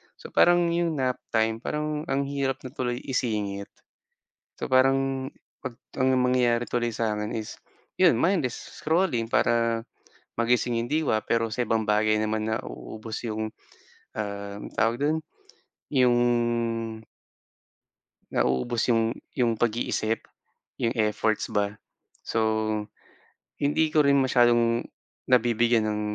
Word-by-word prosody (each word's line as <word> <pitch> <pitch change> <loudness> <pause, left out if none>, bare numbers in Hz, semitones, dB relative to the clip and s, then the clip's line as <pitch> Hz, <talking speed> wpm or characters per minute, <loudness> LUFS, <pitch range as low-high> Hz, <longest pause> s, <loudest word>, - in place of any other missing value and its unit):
so, - - -11
parang 175 -1 +5
'yong 170 -1 +1
nap 130 -3 0 0.2
time 110 0 +2
parang 150 +3 -3
ang 140 -1 +1
hirap 140 -1 -2
na 130 - -7
tuloy 125 -1 -3
isingit. 105 -6 -2 0.9
So, - - -3
parang 135 0 +2 0.3
'pag 130 -3 -6 0.3
ang 130 0 +4
mangyayari 125 -1 +2
tuloy 120 -1 0
sa'kin 110 -1 -2
is 110 -1 -6 0.4
'yon, - - +6
mindless 165 - +1 0.2
scrolling 160 -9 +1
para 115 -1 +2 0.5
magising 120 0 +2
'yong 115 - -2
diwa, 155 -6 +1
pero 115 -1 +1
sa 125 +2 -1
ibang 110 0 +1
bagay 105 0 +2
naman 110 0 -1
nauubos 110 -1 -5
'yong, 110 -1 -2 0.7
um, 100 -1 -4
tawag 115 +1 +2
do'n, 155 +2 +2 0.7
'yong 125 -3 +4 2.2
Nauubos 115 - +1
'yong 115 0 +2 0.2
'yong 115 -2 +2
pag-iisip, 115 -1 -1 0.5
'yong 115 - +1
efforts 110 0 0
ba. 100 -1 0 0.5
So, 115 - -2 1.2
hindi 150 +3 +2
ko 150 -2 +4
rin 140 0 +5
masyadong 120 -2 +3 0.4
nabibigyan 120 -2 +3
ng, 105 0 -1
120 Hz, 115 wpm, -26 LUFS, 110-135 Hz, 2.2 s, yon